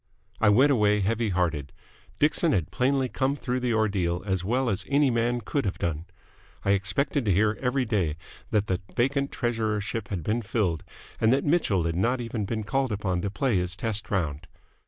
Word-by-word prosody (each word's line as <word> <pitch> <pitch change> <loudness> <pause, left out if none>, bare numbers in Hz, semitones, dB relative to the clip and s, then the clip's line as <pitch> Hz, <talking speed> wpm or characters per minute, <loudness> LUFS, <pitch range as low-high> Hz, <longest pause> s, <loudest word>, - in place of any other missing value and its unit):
I 110 - +4
went 130 +8 +5
away 105 -4 +3
heavy 110 +3 0
hearted. 80 -7 -1 0.5
Dixon 155 +2 +2
had 85 -5 0
plainly 130 +1 +1
come 135 +2 0
through 125 -3 -2
the 125 -2 0
ordeal 95 -5 0
as 95 -3 -1
well 125 +6 0
as 100 -5 0
any 140 -1 +3
man 120 +1 0
could 140 +6 -1
have 95 -3 -2
done. 80 -1 -2 0.6
I 100 - +3
expected 105 +9 +1
to 100 - +2
hear 105 +4 +3
every 130 0 +1
day 95 -9 0 0.3
that 105 -1 +1
the 95 -3 -1
vacant 140 +3 +1
treasurership 110 -2 -2
had 95 -8 -4
been 110 +8 0
filled, 95 -6 -1 0.4
and 110 - +4
that 135 +2 +2
Mitchell 145 - +2
had 85 0 -1
not 120 +8 +1
even 115 -3 -3
been 110 +1 -3
called 135 +3 0
upon 95 -4 -1
to 100 - -2
play 120 0 0
his 90 +1 -1
test 110 0 -2
round. 80 -5 -2
110 Hz, 190 wpm, -26 LUFS, 95-125 Hz, 0.6 s, went